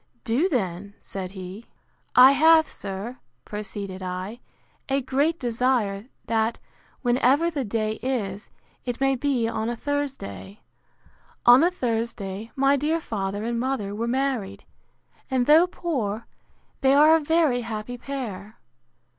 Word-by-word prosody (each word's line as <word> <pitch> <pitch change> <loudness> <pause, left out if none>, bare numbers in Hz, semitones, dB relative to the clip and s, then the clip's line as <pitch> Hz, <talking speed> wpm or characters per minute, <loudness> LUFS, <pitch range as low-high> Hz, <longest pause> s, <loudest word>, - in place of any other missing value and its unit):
Do 270 +10 +1
then, 200 - -2
said 190 -2 -6
he. 190 +3 -9 0.5
I 255 +2 +9
have, 315 +3 +6
sir, 205 +6 -6 0.3
proceeded 205 -2 -6
I, 185 +5 -5 0.5
a 270 +1 +2
great 280 +5 0
desire, 235 -4 0 0.2
that, 225 0 0 0.5
whenever 265 +7 +3
the 285 -4 -2
day 215 -1 -2
is, 210 -6 -3 0.3
it 245 -1 -4
may 270 0 +2
be 255 -3 0
on 225 0 -2
a 240 - -2
Thursday: 255 - -4 0.8
On 245 +4 +8
a 345 - +5
Thursday 225 - -3
my 275 0 +4
dear 305 +4 0
father 205 -6 -3
and 235 0 -1
mother 245 -6 -2
were 225 +3 -2
married; 235 -6 -1 0.7
and, 260 -2 +1
though 315 +5 +6
poor, 240 - -3 0.6
they 270 0 +4
are 305 +3 +7
a - - +3
very 310 -5 +2
happy 230 +1 -5
pair. 230 -6 -6
240 Hz, 130 wpm, -25 LUFS, 205-275 Hz, 0.8 s, I